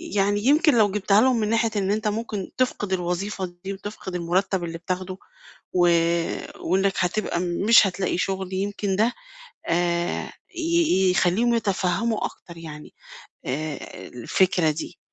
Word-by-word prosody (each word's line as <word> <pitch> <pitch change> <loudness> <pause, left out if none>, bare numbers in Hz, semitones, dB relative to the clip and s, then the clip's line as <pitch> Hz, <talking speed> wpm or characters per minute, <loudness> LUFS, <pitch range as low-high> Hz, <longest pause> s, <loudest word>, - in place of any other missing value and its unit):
يعني 205 +2 +1
يمكن 295 -1 +5
لو 210 -3 +4
جبتها 200 +1 +3
لهُم 255 -2 +3
من 210 - 0
ناحية 230 0 +2
إن 195 -1 0
أنت 215 +1 0
ممكن 210 -2 -3
تفقد 210 -6 0
الوظيفة 185 +2 -2 0.2
دي، 195 - -3
وتفقد 195 -2 -7
المُرتّب 180 +2 0
اللي 165 -1 -4
بتاخده، 185 +2 -4 0.6
و 175 -1 +4 0.7
وإنَّك 195 +2 +1
هتبقى 180 -1 0
مش 195 +6 +4
هتلاقي 190 -1 -1
شُغل، 190 0 -2
يمكن 200 0 -1
ده 225 +4 +2 0.6
آآ، 175 0 0 0.3
ي 330 - +2
يخلّيهم 210 +6 +2
يتفهموا 210 +1 0
أكتر 170 -1 -9
يعني، 155 -2 -10 0.5
آآ، 150 +2 -5
الفكرة 170 +7 +1
دي. 160 +3 -7
190 Hz, 135 wpm, -24 LUFS, 175-215 Hz, 0.7 s, يمكن